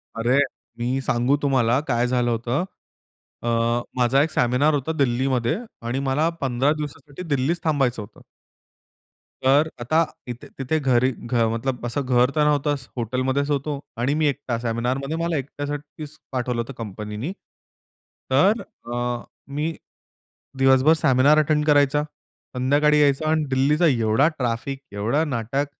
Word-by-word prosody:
अरे! 120 +4 +2 0.4
मी 125 +3 0
सांगू 125 +2 +1
तुम्हाला 130 -3 +2
काय 120 -1 +1
झालं 125 -1 +1
होतं. 120 +8 -1 0.8
अ, - - -3 0.5
माझा 125 +3 +3
एक 160 - -1
सेमिनार 125 +5 +2
होता 145 +2 -1
दिल्लीमध्ये 125 -2 +1 0.3
आणि 130 +3 -1
मला 150 +5 +2
15 135 +2 +1
दिवसासाठी 145 +2 -7
दिल्लीत 135 +6 +1
थांबायचं 135 -7 +1
होतं. 105 - -13 1.2
तर 140 +4 +4
आता 145 +7 0 0.3
इथे 120 -1 -7
तिथे 135 +4 -1
घरी 130 -2 +2
घ 120 -1 -1
मतलब 125 +1 -3
असं 120 +4 -1
घर 125 0 +3
तर 150 - +3
नव्हतं. 145 0 +2 0.2
हॉटेलमध्येच 130 +4 -1
होतो 145 0 -1 0.2
आणि 125 +5 +1
मी 155 0 +2
एकटा 140 -4 -2
सेमिनारमध्ये 125 +5 -2
मला 165 -2 -1
एकट्यासाठीच 145 +2 -6
पाठवलं 125 -2 -1
होतं 125 +4 -7
कंपनीनी. 105 - -5 1.0
तर 195 - +4 0.3
अ, 120 0 -2 0.2
मी 150 +4 -3 0.8
दिवसभर 135 +3 +5
सेमिनार 140 +1 +5
अटेंड 150 0 +1
करायचा. 145 -1 +3 0.5
संध्याकाळी 145 +4 +3
यायचा 145 +2 +2
आणि 160 -1 +2
दिल्लीचा 145 +6 +3
एवढा 115 +1 +3
ट्रॅफिक, 125 +2 -2
एवढा 110 +10 0
नाटक. 135 +1 -1
135 Hz, 135 wpm, -23 LUFS, 120-145 Hz, 1.2 s, दिवसभर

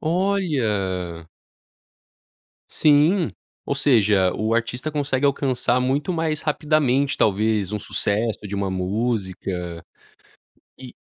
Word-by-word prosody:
Olha! 110 - -1 1.4
Sim, 155 +4 +3 0.4
ou 140 - 0
seja, 105 -9 +3
o 110 +1 0
artista 125 +5 -2
consegue 145 -2 0
alcançar 130 -3 +1
muito 140 +7 0
mais 160 -2 -1
rapidamente, 145 -3 +1
talvez 105 -1 +1
um 105 - -1
sucesso 105 +2 -1
de 100 - -5
uma 100 -1 -1
música. 95 -4 -3 0.9
E 130 -2 -11
120 Hz, 95 wpm, -22 LUFS, 100-145 Hz, 1.4 s, Sim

